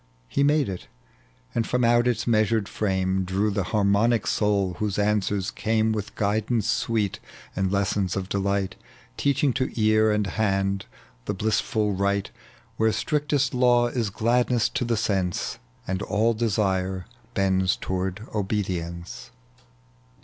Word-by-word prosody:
He 140 - -1
made 145 0 +3
it, 95 -2 -6 0.7
and 115 - 0
from 125 0 +1
out 120 +1 +4
its 125 - 0
measured 110 -2 +2
ft 105 +1 -2
ame 95 0 0
Drew 95 +3 0
the 100 -2 -1
harmonic 105 +2 +2
soul, 100 -3 +1
whose 105 -3 -1
answers 105 -2 0
came 110 0 +1
With 105 -2 -4
guidance 110 +2 0
sweet 110 -3 0 0.4
and 95 -1 0
lessons 100 -1 0
of 95 -1 -3
delight 100 0 -1 0.5
TcacliiDg 140 -1 +2
to 130 +1 0
ear 110 0 +4
and 105 -1 +1
hand 95 -1 0 0.4
the - - -2
blissful 105 0 0
Right, 100 +1 0 0.5
"Where 110 0 +3
strictest 145 +2 0
law 120 -1 +4
is 120 -4 -1
gladness 120 +3 +1
to 125 - -2
the 115 -1 0
sense, 95 -5 -1 0.3
And 95 +1 -2
all 110 +3 +1
desire 95 -5 0 0.3
bonds 95 -1 +2
toward 95 +3 -3
obedience. 90 -5 -3
105 Hz, 135 wpm, -25 LUFS, 95-115 Hz, 0.7 s, out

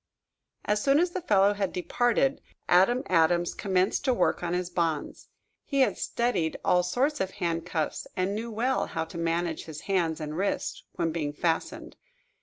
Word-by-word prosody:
As 210 0 +1
soon 275 +3 +4
as 350 +1 +2
the 370 - -3
fellow 200 - +4
had 200 -2 -2
departed, 245 - +1 0.3
Adam 195 +9 +4
Adams 175 0 +2
commenced 190 -1 0
to 255 -2 +3
work - - +1
on 175 0 -1
his 180 0 -2
bonds. 165 -4 -2 0.3
He 275 -2 0
had 260 - +3
studied 235 -10 -1
all 180 - +4
sorts 250 - 0
of 190 - 0
handcuffs, 170 -3 -2
and 185 +2 0
knew 225 +3 -4
well 240 +4 0
how 160 - -3
to 170 - -10
manage 165 0 -1
his 155 -2 -8
hands 175 -5 0
and 150 -1 -5
wrists 195 +4 -2
when 165 -2 0
being 150 -3 -2
fastened. 165 +2 -2
180 Hz, 170 wpm, -28 LUFS, 165-225 Hz, 0.3 s, soon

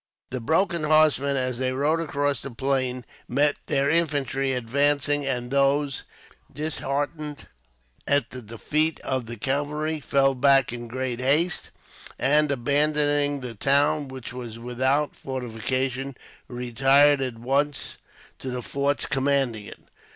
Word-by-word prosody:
The 130 - -3
broken 165 - +1
horsemen, 150 -3 +3
as 125 -2 -2
they 130 0 0
rode 150 +5 +1
across 145 -4 -1
the 140 - -5
plain, 130 -1 -1 0.2
met 145 +1 +2
their 140 -1 +1
infantry 140 -4 +1
advancing; 140 +3 +1
and 125 -2 -2
these, 140 0 +2 0.5
disheartened 150 0 -3 0.6
at 140 -4 +1
the 130 - -7
defeat 150 +8 -1
of 130 -3 -2
the 120 0 -7
cavalry, 150 +5 -1
fell 135 -1 +2
back 135 -1 +4
in 120 -1 -6
great 125 0 -3
haste; 150 +7 +1 0.5
and, 150 +3 +3
abandoning 145 +1 +1
the 125 -2 -5
town, 140 +5 +2
which 130 -2 -8
was 120 -3 -7
without 130 +5 0
fortification, 130 +1 -3 0.3
retired 135 +4 +3
at 125 -3 -3
once 140 +4 -1 0.4
to 130 - -5
the 125 -1 -4
forts 140 +3 0
commanding 135 -5 0
it. - - -11
135 Hz, 130 wpm, -25 LUFS, 125-145 Hz, 0.6 s, back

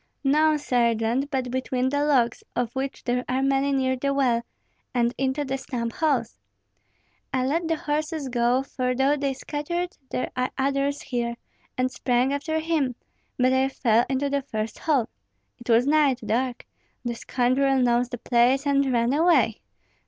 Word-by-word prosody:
"No, 305 +2 +3
Sergeant, 240 0 +1
but 260 -4 -2
between 255 0 -1
the 285 +1 0
logs, 255 -6 +2
of 240 -1 -1
which 265 +1 -4
there 250 0 0
are 260 +1 +1
many 275 +1 +2
near 260 -1 +1
the 275 +2 -1
well, 250 -4 +2 0.5
and 240 0 +2
into 270 +2 -1
the 270 0 -3
stump 235 -3 -4
holes. 270 - 0 0.9
I 255 -1 0
let 325 +5 0
the 325 - +1
horses 305 0 -2
go; 245 +1 +1
for 255 -2 -2
though 270 +3 +3
they 280 -1 -1
scattered 345 +6 -4
there 250 - -3
are 255 0 0
others 275 +1 0
here, 235 -2 -2 0.4
and 255 0 +1
sprang 250 +2 +1
after 315 +3 -2
him, 315 -6 0 0.4
but 255 +1 +3
I 260 0 +3
fell 235 -3 +2
into 270 +1 0
the 280 0 0
first 220 -5 -4
hole. 280 -8 +1 0.5
It 240 - -12
was 230 +2 +5
night, 290 -3 +3
dark; 245 +3 -1 0.4
the 240 - -1
scoundrel 260 +3 +1
knows 245 -1 +2
the 245 - -5
place, 245 +4 +2
and 280 -1 +2
ran 235 +1 +2
away. 295 -8 +3
265 Hz, 165 wpm, -25 LUFS, 245-280 Hz, 0.9 s, was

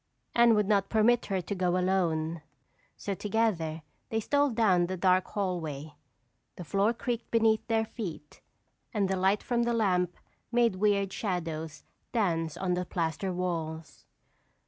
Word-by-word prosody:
Anne 235 -1 +6
would 210 -2 +2
not 200 -2 +2
permit 230 +2 +3
her 190 -2 0
to 200 - -4
go 180 -2 +1
alone 170 -3 0 0.6
so 200 - -3
together 190 -6 -1 0.3
they 225 - 0
stole 285 +6 +2
down 200 -7 +3
the 185 +1 -3
dark 185 0 +3
hallway. 160 -7 -3 0.6
The 180 - -7
floor 200 +6 +2
creaked 235 0 -4
beneath 225 -1 +2
their 225 -1 +1
feet 175 -10 -7 0.5
and 200 -2 +2
the 190 - 0
light 190 +2 +2
from 240 -1 0
the 235 0 +1
lamp 180 -6 +1 0.3
made 235 -5 +3
weird 200 -1 +2
shadows 165 -6 -3 0.3
dance 165 -8 0
on 185 -2 0
the 180 0 0
plaster 170 +1 -2
walls. 165 -4 -4
190 Hz, 145 wpm, -29 LUFS, 170-220 Hz, 0.6 s, Anne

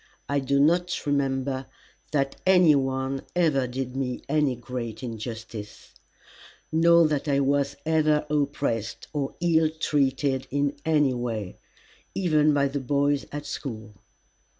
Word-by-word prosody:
I 140 0 +1
do 140 +1 +1
not 175 +4 +2
remember 135 -2 -1 0.4
that 135 -2 0
any 180 -4 +6
one 135 -1 -1
ever 150 -7 +2
did 125 0 -4
me 130 -2 -3
any 145 -3 +1
great 120 -1 -6
injustice, 110 -2 -7 0.8
nor 170 0 +5
that 150 -1 -2
I 140 -1 +2
was 140 0 +1
ever 155 -1 +2
oppressed 140 -6 -1
or 140 -2 -2
ill 160 -2 +3
treated 140 -3 0
in 145 +1 0
any 150 -4 +3
way, 115 -6 -4 0.6
even 155 -5 +3
by 140 -1 +2
the 140 +1 -3
boys 140 +2 0
at 145 0 -5
school. 110 -7 -6
140 Hz, 125 wpm, -26 LUFS, 130-150 Hz, 0.8 s, any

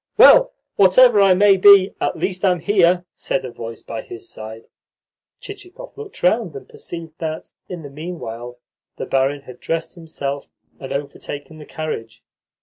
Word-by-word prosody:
"Well, - - +7 0.3
whatever 210 +3 +6
I 195 -2 +5
may 200 0 +5
be, 195 0 +7
at - - -1
least 185 0 -3
I'm 180 -3 +2
here," 180 -2 +2
said 135 -1 -3
a 125 - -7
voice 115 -1 -9
by 115 - -6
his 115 0 -11
side. 110 +1 -9 0.7
Chichikov 405 +4 -11
looked 435 -2 -11
round, 180 -3 +1
and 135 - -9
perceived 165 -1 -10
that, 160 -1 -5 0.2
in 175 -3 -7
the 145 - -8
meanwhile, 125 -7 -7 0.4
the - - -4
barin 135 +1 0
had 125 -2 -13
dressed 165 0 -3
himself 145 -5 -6 0.3
and 135 -1 -8
overtaken 145 +2 -6
the 150 - -12
carriage. 135 -8 -6
165 Hz, 155 wpm, -20 LUFS, 135-195 Hz, 0.7 s, Well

